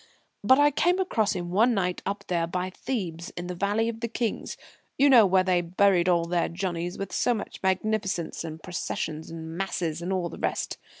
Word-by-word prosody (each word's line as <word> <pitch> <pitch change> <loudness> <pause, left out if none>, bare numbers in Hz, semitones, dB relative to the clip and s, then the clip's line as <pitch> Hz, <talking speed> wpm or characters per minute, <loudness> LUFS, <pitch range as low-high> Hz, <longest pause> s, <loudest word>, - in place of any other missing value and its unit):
But 260 +6 +6
I 290 0 +5
came 355 +6 +2
across 225 - +1
him 175 -2 -4
one 225 +6 +4
night 180 -2 -1
up 200 +1 -3
there 170 -2 0
by 180 +2 -3
Thebes 180 -8 -4
in 175 - -4
the 180 - -4
Valley 205 +5 0
of 230 -1 -4
the 235 - -2
Kings 230 0 -3 0.4
you 280 +1 +5
know, 230 -6 +8
where 185 0 +4
they 180 -1 +2
buried 180 +1 +3
all 170 -1 +3
their 170 0 0
Johnnies 175 -1 -3
with 195 -1 -5
so 245 - +2
much 205 - -7
magnificence 190 -2 -1
and 160 -1 -7
processions 160 -3 -4
and 160 0 -7
masses, 170 -3 -2
and 175 +2 -3
all 185 -2 0
the - - -9
rest. - - -2
185 Hz, 200 wpm, -27 LUFS, 170-215 Hz, 0.4 s, know